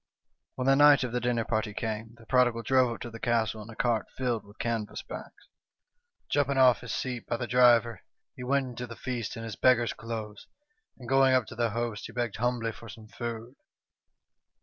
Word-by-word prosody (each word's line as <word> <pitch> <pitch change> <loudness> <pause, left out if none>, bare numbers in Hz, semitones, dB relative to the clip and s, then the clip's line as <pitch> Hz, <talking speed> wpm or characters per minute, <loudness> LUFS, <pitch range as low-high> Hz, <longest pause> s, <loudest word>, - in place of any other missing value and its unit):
"When 130 - -3
the 135 0 +5
night 145 -1 +7
of 125 - -3
the 125 - 0
dinner 120 -1 0
party 110 -2 -2
came, 110 0 -4
the 115 - -16
prodigal 120 -2 +2
drove 130 -1 +3
up - - -14
to 120 - -6
the 115 - -9
castle 110 -2 0
in 105 - -11
a 115 - -10
cart 120 -2 0
filled 120 -4 -1
with 100 +1 -18
canvas 115 -3 -3
bags. - - -10 0.8
Jumping 140 -1 +1
off 125 -4 +5
his 125 - -6
seat 125 -3 -4
by 120 - -1
the 120 - -3
driver, 120 -3 +4 0.3
he 125 - -8
went 135 +1 +1
into 125 0 -6
the 115 - -9
feast 125 -2 -4
in 115 - -6
his 115 -2 -6
beggar's 120 -3 +3
clothes, 110 -2 -7 0.5
and 125 - -11
going 135 0 +4
up 130 -3 +2
to 115 - -10
the 120 0 +1
host, 115 -1 -3
he - - -13
begged 120 -3 -2
humbly 120 -1 0
for 115 +1 -12
some 110 +1 -12
food. 120 +1 -6
120 Hz, 205 wpm, -28 LUFS, 115-125 Hz, 0.8 s, night